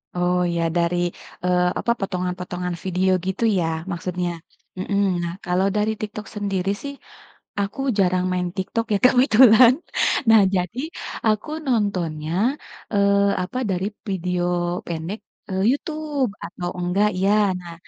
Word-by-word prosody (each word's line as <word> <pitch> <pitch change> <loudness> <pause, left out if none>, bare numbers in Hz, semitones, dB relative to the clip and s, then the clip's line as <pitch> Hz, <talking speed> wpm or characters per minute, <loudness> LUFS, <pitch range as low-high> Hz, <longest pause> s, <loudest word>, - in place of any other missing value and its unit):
Oh 180 0 +1
ya 170 - 0 0.2
dari, 175 +1 +1 0.5
eee, 180 0 +3
apa 235 - +1
potongan-potongan 180 -2 -3
video 185 0 +1 0.2
gitu 190 +4 -2 0.2
ya 170 - +1 0.3
maksudnya. 180 0 -2 0.5
Mhm, 200 +2 0 0.2
nah 170 - -3
kalau 180 +2 +2
dari 210 +1 +1
TikTok 210 0 -5
sendiri 195 -2 -1
sih, 280 0 -5 0.7
aku 200 +5 -3 0.2
jarang 185 -1 +2
main 180 -1 0
TikTok 225 +4 -1
ya 205 - +4
kebetulan, 250 -1 +7 0.6
nah 225 -1 +8
jadi 180 +6 -2 0.5
aku 215 +6 +1 0.2
nontonnya, 180 -10 -1 0.6
eee, 200 0 +3
apa 190 +7 -5
dari 185 +1 -1 0.2
video 180 -1 -1 0.4
pendek, 170 +5 -4 0.3
eee, 190 0 -1
YouTube 295 - -2
atau 175 +1 -5
enggak 180 +4 +2
iya 195 +2 +2 0.3
nah 170 -1 -9
190 Hz, 130 wpm, -22 LUFS, 180-210 Hz, 0.7 s, nah